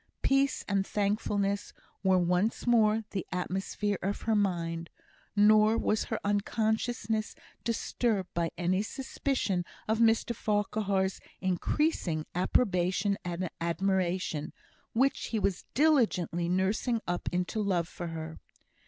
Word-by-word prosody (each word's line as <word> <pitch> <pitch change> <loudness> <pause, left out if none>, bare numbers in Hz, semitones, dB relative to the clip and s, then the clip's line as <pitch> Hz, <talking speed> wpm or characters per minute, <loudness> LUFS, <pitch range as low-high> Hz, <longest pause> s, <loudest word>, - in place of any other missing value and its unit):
Peace 275 0 +2
and 200 -1 +1
thankfulness 200 0 -1 0.3
were 190 -1 +4
once 180 +4 +1
more 225 -2 +4
the 190 -4 -2
atmosphere 190 +3 -2
of 200 +3 -2
her 225 - +1
mind; 170 -5 0 0.5
nor 215 +1 +6
was 215 - +1
her 225 - -3
unconsciousness 220 +2 0 0.3
disturbed 230 -3 -1
by 170 -1 0
any 180 +2 +1
suspicion 255 -5 -1 0.2
of 220 +1 +1
Mr 230 +1 +3
Farquhar's 205 -2 0 0.2
increasing 185 - 0
approbation 185 +1 +1
and 180 +1 -2
admiration, 175 -2 0 0.4
which 265 +4 +2
he 225 - -2
was 200 -3 -1
diligently 220 - +2
nursing 200 +6 +1
up 175 0 -1
into 180 +4 -1
love 180 -5 +1
for 175 0 -6
her. 160 -1 -6
200 Hz, 115 wpm, -30 LUFS, 180-220 Hz, 0.5 s, nor